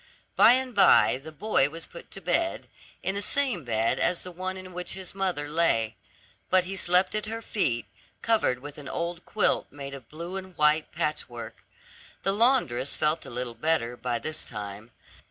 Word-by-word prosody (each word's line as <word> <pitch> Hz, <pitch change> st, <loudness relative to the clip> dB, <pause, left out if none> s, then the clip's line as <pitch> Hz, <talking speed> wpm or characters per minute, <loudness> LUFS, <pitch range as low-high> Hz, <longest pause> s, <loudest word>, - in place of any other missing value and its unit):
By 235 Hz, -, +8 dB
and 260 Hz, 0 st, 0 dB
by 135 Hz, -, +5 dB
the 160 Hz, -, -8 dB
boy 155 Hz, -4 st, +2 dB
was 165 Hz, +2 st, -8 dB
put 170 Hz, -, -12 dB
to 195 Hz, -, -8 dB
bed, 330 Hz, -, 0 dB, 0.4 s
in 190 Hz, -, 0 dB
the 200 Hz, -, -2 dB
same 255 Hz, -, +2 dB
bed 115 Hz, -2 st, 0 dB
as 175 Hz, -, +1 dB
the 180 Hz, -, -7 dB
one 185 Hz, +2 st, -4 dB
in 185 Hz, -1 st, -10 dB
which 180 Hz, 0 st, -3 dB
his 190 Hz, -2 st, -7 dB
mother 185 Hz, -7 st, -1 dB
lay; 145 Hz, -9 st, +2 dB, 0.5 s
but 185 Hz, -1 st, +5 dB
he 190 Hz, +2 st, -5 dB
slept 180 Hz, 0 st, +2 dB
at 215 Hz, 0 st, -2 dB
her 225 Hz, +1 st, -4 dB
feet, 130 Hz, -, 0 dB, 0.4 s
covered 225 Hz, -, +2 dB
with 145 Hz, +3 st, -9 dB
an 140 Hz, -, -8 dB
old 170 Hz, 0 st, -3 dB
quilt 215 Hz, -, +2 dB
made 140 Hz, -1 st, -8 dB
of 130 Hz, -4 st, -10 dB
blue 170 Hz, +5 st, -6 dB
and 185 Hz, -2 st, -9 dB
white 150 Hz, 0 st, +3 dB
patchwork. 120 Hz, -6 st, -3 dB, 0.6 s
The 195 Hz, -, +2 dB
laundress 205 Hz, -, +2 dB
felt 155 Hz, +1 st, 0 dB
a -, -, -7 dB
little 120 Hz, 0 st, -4 dB
better 120 Hz, -1 st, 0 dB
by 120 Hz, -1 st, -2 dB
this 155 Hz, +7 st, -2 dB
time. 105 Hz, 0 st, -7 dB
165 Hz, 185 wpm, -27 LUFS, 130-190 Hz, 0.6 s, By